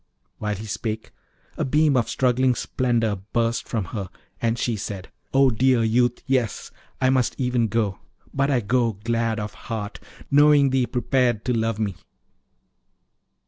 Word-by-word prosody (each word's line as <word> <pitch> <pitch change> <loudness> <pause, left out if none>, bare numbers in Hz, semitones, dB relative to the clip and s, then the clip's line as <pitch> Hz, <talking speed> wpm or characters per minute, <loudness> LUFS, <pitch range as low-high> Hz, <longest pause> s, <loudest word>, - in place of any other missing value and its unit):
While 105 -1 -2
he 105 +3 -7
spake, 110 +1 -4 0.5
a - - 0
beam 150 +1 +3
of 120 -3 +1
struggling 125 0 +2
splendour 115 -6 0 0.2
burst 115 0 0
from 110 -5 -1
her, 100 -4 -4 0.3
and 115 0 +1
she 120 -1 0
said, 100 -2 -6 0.2
'O 135 -1 +4
thou 110 - -7
dear 130 -1 +4
youth, 120 +2 +1
yes! 130 -5 -1 0.3
I 130 0 +3
must 130 -3 +1
even 125 -3 +1
go. 105 -3 -1 0.3
But 140 0 +1
I 130 -4 +2
go 115 +1 +1
glad 115 +2 -1
of 105 0 -5
heart, 110 -3 -6 0.3
knowing 145 -1 +6
thee 130 -2 +2
prepared 125 -3 +1
to 125 - +1
love 115 -1 0
me. 100 -5 -2
115 Hz, 155 wpm, -24 LUFS, 110-130 Hz, 0.5 s, knowing